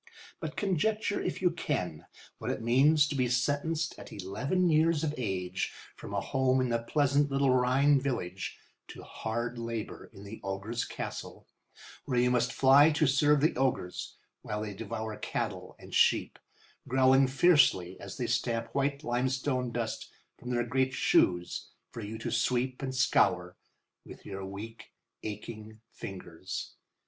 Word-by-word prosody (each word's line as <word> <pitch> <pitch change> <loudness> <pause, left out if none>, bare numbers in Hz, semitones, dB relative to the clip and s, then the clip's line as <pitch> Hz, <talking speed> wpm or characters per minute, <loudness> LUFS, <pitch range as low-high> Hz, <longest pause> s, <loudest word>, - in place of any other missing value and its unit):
But - - -6
conjecture, 205 +2 0
if - - -3
you 180 - +4
can, 90 - -3 0.3
what - - -4
it - - -3
means 140 +6 +5
to 150 - -3
be 130 -3 +1
sentenced 145 +6 0
at - - -11
eleven 120 - -1
years 160 0 +3
of 150 -2 0
age 95 -6 -2 0.2
from - - -9
a 100 - 0
home 130 +4 +1
in 130 -1 +1
the 115 0 0
pleasant 145 +3 +2
little 135 -1 +2
Rhine 130 +3 +4
village 95 -9 -3 0.3
to - - -10
hard 120 +2 -4
labour 115 -2 -5
in 100 -2 -12
the 105 +2 -9
ogre's 100 +5 -3
castle, - - -6 0.6
where 130 -4 -1
you 125 +1 +4
must 125 0 +2
fly 135 +3 +6
to 155 +1 +2
serve 145 +2 +4
the 155 - +3
ogres, 125 -9 -1 0.3
while 105 0 -4
they 105 -1 -5
devour 110 +1 -5
cattle - - -4
and - - -13
sheep, - - +3 0.5
growling 130 +1 +5
fiercely 135 - +4
as 100 -1 -8
they 125 - -2
stamp 115 -1 -1
white 140 +1 0
limestone 130 0 0
dust 115 -1 -3 0.3
from 125 - -9
their 120 -1 0
great 130 +2 +1
shoes 90 -7 +2 0.2
for 115 - -7
you 110 +1 -6
to 115 +1 -4
sweep 125 +2 0
and 130 -1 -3
scour 90 -8 +2 0.5
with - - -13
your 95 -1 -6
weak, 100 +4 -8 0.3
aching 110 +1 -7
fingers. 95 -2 -7
125 Hz, 155 wpm, -30 LUFS, 110-140 Hz, 0.6 s, fly